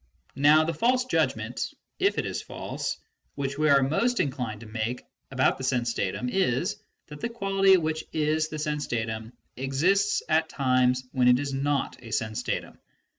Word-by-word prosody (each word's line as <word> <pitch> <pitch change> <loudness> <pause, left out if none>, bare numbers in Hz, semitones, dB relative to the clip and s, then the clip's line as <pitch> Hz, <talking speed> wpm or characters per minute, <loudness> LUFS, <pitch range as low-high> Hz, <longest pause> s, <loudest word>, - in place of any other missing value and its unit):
Now 150 +2 +7
the 165 +1 -1
false 250 +9 +2
judgment 255 - -1 0.2
(if 395 +1 +2
it - - 0
is - - -3
false) - - -5 0.4
which 140 0 -3
we 155 0 +3
are 140 -1 +6
most 235 - +1
inclined 125 -6 -2
to - - -9
make 110 +3 -3 0.3
about 130 -1 +1
the - - -5
sense 125 -3 0
datum 100 +5 -2
is, 185 - 0 0.3
that 150 0 -9
the 235 - -2
quality 195 -4 +3
which 160 -2 -2
is 155 0 +1
the 155 - -6
sense 150 -1 -2
datum 110 -1 -3 0.2
exists 175 +11 +1
at 160 0 +2
times 130 -1 +2
when 125 -2 +2
it 125 0 +6
is 140 +1 -3
not 140 +1 -1
a 115 - -9
sense 110 -1 -2
datum. - - -4
140 Hz, 175 wpm, -27 LUFS, 125-160 Hz, 0.4 s, Now